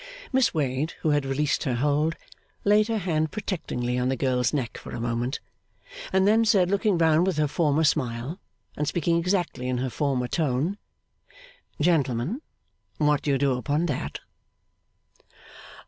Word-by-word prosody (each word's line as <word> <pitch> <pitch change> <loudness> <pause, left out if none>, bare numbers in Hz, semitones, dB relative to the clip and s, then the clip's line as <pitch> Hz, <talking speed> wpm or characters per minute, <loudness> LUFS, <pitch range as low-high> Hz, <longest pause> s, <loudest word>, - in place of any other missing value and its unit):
Miss 265 -1 +4
Wade, 145 +1 -1
who 155 - +2
had 145 -2 +1
released 145 +2 0
her 130 -3 0
hold, 150 +5 +1 0.5
laid 210 +1 +4
her 225 -1 0
hand 160 -5 0
protectingly 125 - -2
on 125 +1 +1
the 135 - +1
girl's 125 -2 +1
neck 130 -6 -3
for - - -8
a - - -5
moment, 120 +3 -2 0.7
and 190 +1 +3
then 220 +2 +5
said, 195 -4 +3
looking 200 -1 +2
round 165 +1 +4
with 185 -5 0
her 150 -1 +2
former 155 +1 +1
smile 135 +2 0 0.4
and 150 - -2
speaking 170 +1 +1
exactly 170 -7 -1
in 125 -1 0
her 130 0 -2
former 135 -3 0
tone, 155 +7 -1 1.0
'Gentlemen! 150 - +1 0.6
What 150 -1 +2
do - - -3
you 140 - +3
do 140 0 +2
upon 145 +7 0
that? 145 -7 -3
150 Hz, 155 wpm, -26 LUFS, 130-175 Hz, 1.0 s, then